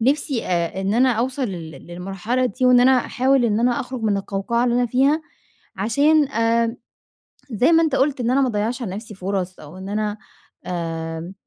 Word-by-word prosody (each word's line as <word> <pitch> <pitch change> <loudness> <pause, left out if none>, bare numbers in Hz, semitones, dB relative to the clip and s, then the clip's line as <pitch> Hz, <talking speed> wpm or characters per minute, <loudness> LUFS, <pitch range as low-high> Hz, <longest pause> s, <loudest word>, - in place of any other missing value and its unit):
نفسي 270 0 0
آآ 175 +1 -1
إن 195 +2 0
أنا 255 +1 +4
أوصَل 255 +4 -2
لل 165 -4 -6 0.2
للمرحلة 195 +8 -2
دي، 255 +3 -1
وإن 250 -1 +6
أنا 260 +1 +5
أحاول 260 0 +2
إن 220 0 +1
أنا 245 +2 +2
أخرج 255 -2 -6
من 210 -2 +1
القوقعة 195 +4 -1
اللي 240 -1 +1
أنا 245 0 +2
فيها، 275 +6 +2 0.6
عشان 285 +9 +3
آآ 230 -2 +1 0.8
زي 240 +9 +3
ما 330 0 +5
أنت 300 -4 +1
قُلت 275 -1 +1
إن 240 0 0
أنا 275 - +3
ما 265 - +2
أضيّعش 230 +2 -2
على 190 -4 -4
نفسي 220 +1 -8
فرص، 185 -1 -3
أو 150 +4 -11
إن 190 +1 -7
أنا 210 0 -2 0.5
آآ 165 0 -4
230 Hz, 190 wpm, -21 LUFS, 195-255 Hz, 0.8 s, وإن